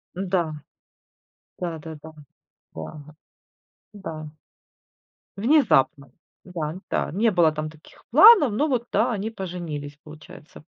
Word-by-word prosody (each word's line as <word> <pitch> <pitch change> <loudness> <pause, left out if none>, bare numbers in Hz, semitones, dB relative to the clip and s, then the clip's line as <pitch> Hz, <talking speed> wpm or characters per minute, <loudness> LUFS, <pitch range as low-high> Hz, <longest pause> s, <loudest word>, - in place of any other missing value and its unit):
Да. 180 -4 -1 1.1
Да 170 -2 -3
да 160 +1 -9
да 155 +1 -13 0.6
да 145 - -9 0.8
да. 160 -6 -7 1.1
Внезапно. 200 - +2 0.3
Да, 165 -4 -5
да. - - -1
Не 215 +6 +2
было 170 -4 +4
там 155 0 -4
таких 155 0 -19
планов, 315 - +8
но 255 +9 0
вот, 245 -4 -1
да, 225 +5 +2
они 215 -1 -3
поженились, 170 -8 -6
получается. 150 -1 -14
175 Hz, 110 wpm, -24 LUFS, 155-215 Hz, 1.1 s, планов